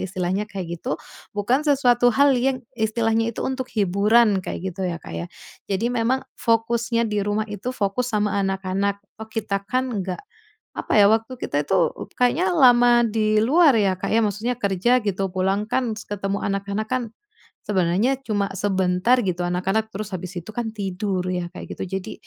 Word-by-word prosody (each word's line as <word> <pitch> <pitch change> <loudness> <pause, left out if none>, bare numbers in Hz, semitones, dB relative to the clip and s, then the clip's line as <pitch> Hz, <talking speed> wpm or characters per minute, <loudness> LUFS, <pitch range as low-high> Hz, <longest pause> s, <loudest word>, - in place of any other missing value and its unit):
istilahnya 185 +2 -2
kayak 175 -4 -5
gitu. 150 - -2 0.4
Bukan 240 +7 +2
sesuatu 245 -4 +4
hal 280 +2 +5
yang 255 +1 0
istilahnya 225 0 +1
itu - - -3
untuk 260 -1 -3
hiburan, 205 +2 +3
kayak 185 +1 -4
gitu 190 - -5
ya, 170 - -3
Kak, 120 - -11
ya. 85 +1 -4 0.4
Jadi 220 +5 0
memang 245 +2 0 0.2
fokusnya 230 0 +1
di 210 -1 -1
rumah 205 +2 0
itu, 210 +3 -6
fokus 240 +1 -1
sama 210 -2 0
anak-anak, 195 +1 -1 0.2
toh, 220 0 -9
kita 205 -3 -2
kan 255 0 0
enggak 185 -1 -4 0.6
apa - - -4
ya, 200 - +8
waktu 225 +3 +1
kita 145 +1 -1
itu 190 -3 +2
u - - -5
kayaknya 260 +10 +2
lama 245 -5 +6
di 215 -1 +1
luar 290 +3 +5
ya, 195 -3 +2
Kak, - - -3
ya? 225 - +4
Maksudnya 215 +4 -1
kerja, 200 +4 +2
gitu. 195 -2 -1
Pulang 195 +3 0
kan 250 -3 0
s - - -9
ketemu 200 -1 -2
anak-anak 200 +2 -2
kan, 255 +1 0 0.7
sebenarnya 195 +7 +1
cuma 205 -2 0
sebentar, 190 +4 +2
gitu. 180 -4 -2
Anak-anak 195 +5 -1
terus 210 +1 -5
habis 180 0 -6
itu 170 - -15
kan 235 -2 -2
tidur 195 -2 -2
ya, 180 -1 -2
kayak - - -8
gitu. - - -3
Jadi, - - -8
210 Hz, 175 wpm, -23 LUFS, 195-240 Hz, 0.7 s, ya